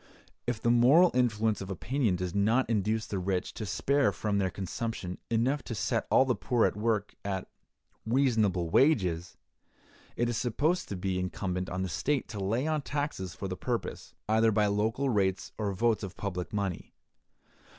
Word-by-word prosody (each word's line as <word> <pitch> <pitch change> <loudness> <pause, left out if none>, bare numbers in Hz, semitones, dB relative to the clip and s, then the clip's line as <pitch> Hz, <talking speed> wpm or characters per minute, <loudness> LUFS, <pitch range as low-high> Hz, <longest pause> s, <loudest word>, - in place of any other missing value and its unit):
If 120 -2 -1
the 120 - +2
moral 135 +10 +6
influence 110 -4 +1
of 95 - -6
opinion 115 +2 0
does 90 -1 -3
not 110 +6 +2
induce 110 0 0
the 100 - -3
rich 90 0 -2
to 110 - -5
spare 140 +9 +2
from 105 -2 -1
their 95 -1 +1
consumption 95 0 -4
enough 125 +6 +1
to 115 - -4
set - - -1
all 130 - +5
the 130 - +2
poor 120 -1 +1
at - - 0
work 105 -1 0
at 95 -2 -3 0.6
"reasonable 110 -9 +1
wages," 90 - +2 0.8
it 120 - +1
is 120 -2 -1
supposed 145 +9 0
to 100 - -3
be 90 0 -1
incumbent 90 0 -3
on 95 +1 -2
the - - -1
state 140 - -1
to 100 -4 -4
lay 115 +8 0
on 155 -1 0
taxes 140 - -3
for 100 - -5
the 90 - -4
purpose, 120 +4 -4
either 110 +1 +4
by 105 0 +3
local 110 +6 0
rates 95 -6 0
or 105 -2 0
votes 115 +3 +1
of 95 -2 -7
public 90 -3 -4
money. 100 -4 -3
105 Hz, 175 wpm, -30 LUFS, 95-120 Hz, 0.8 s, moral